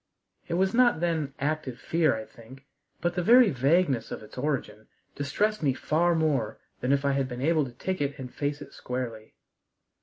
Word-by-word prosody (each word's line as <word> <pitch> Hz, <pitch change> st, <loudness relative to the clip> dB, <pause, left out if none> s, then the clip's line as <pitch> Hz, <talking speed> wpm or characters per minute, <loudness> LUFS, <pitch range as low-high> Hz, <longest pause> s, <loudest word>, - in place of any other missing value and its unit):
It 170 Hz, -, -2 dB
was 190 Hz, +2 st, +2 dB
not 240 Hz, -6 st, +4 dB
then 160 Hz, -5 st, -1 dB
active 145 Hz, -4 st, -2 dB
fear, 165 Hz, -6 st, +2 dB
I 110 Hz, 0 st, -6 dB
think, 130 Hz, +4 st, -15 dB, 0.4 s
but 175 Hz, 0 st, 0 dB
the 180 Hz, -, -1 dB
very 235 Hz, +4 st, +6 dB
vagueness 135 Hz, -2 st, +2 dB
of -, -, -6 dB
its 105 Hz, -, -13 dB
origin 130 Hz, -6 st, -3 dB, 0.3 s
distressed 210 Hz, +10 st, 0 dB
me 135 Hz, -4 st, +1 dB
far 170 Hz, +5 st, +1 dB
more 145 Hz, -9 st, 0 dB, 0.2 s
than 125 Hz, -, 0 dB
if 140 Hz, 0 st, +2 dB
I 140 Hz, -, +3 dB
had 135 Hz, -1 st, 0 dB
been 125 Hz, -1 st, -6 dB
able 155 Hz, -1 st, +3 dB
to 125 Hz, -, -8 dB
ticket 145 Hz, -1 st, -2 dB
and 125 Hz, -1 st, -8 dB
face 145 Hz, 0 st, -3 dB
it -, -, -15 dB
squarely. 120 Hz, -3 st, -5 dB
145 Hz, 185 wpm, -27 LUFS, 130-170 Hz, 0.4 s, very